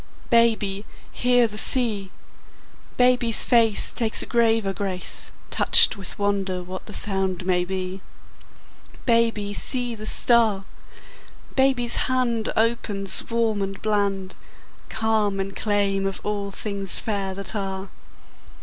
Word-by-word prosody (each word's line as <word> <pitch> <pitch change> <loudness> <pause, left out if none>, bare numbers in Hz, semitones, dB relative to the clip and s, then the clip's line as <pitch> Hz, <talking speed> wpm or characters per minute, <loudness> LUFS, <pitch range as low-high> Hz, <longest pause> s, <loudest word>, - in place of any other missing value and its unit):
Baby, 220 -4 +1 0.3
hear 245 -1 +2
the 210 0 -2
sea! 220 -8 +4 0.9
Baby's 245 -2 +2
face 230 -4 +6
Takes 225 -3 +1
a - - -7
graver 225 -4 0
grace, 190 -1 0 0.2
Touched - - +5
with 195 -3 -6
wonder 195 -3 -2
what 185 +1 -9
the - - -9
sound 190 -3 -3
may 180 -1 0
be. 185 +1 -6 1.0
Baby, 230 -4 0
see 245 +2 -1
the 215 -1 -7
star! 220 -6 +2 0.9
Baby's 265 -3 +2
hand 240 -4 -1
Opens, 220 -4 0
warm 230 -3 -1
and 195 0 -5
bland, 200 -3 -2 0.6
Calm 215 -3 -1
in 195 0 -4
claim 195 -1 -1
of 195 - -4
all 205 -1 -4
things 200 -1 -3
fair 195 -3 -4
that 200 +2 -5
are. 195 -1 -5
205 Hz, 120 wpm, -22 LUFS, 195-230 Hz, 1.0 s, face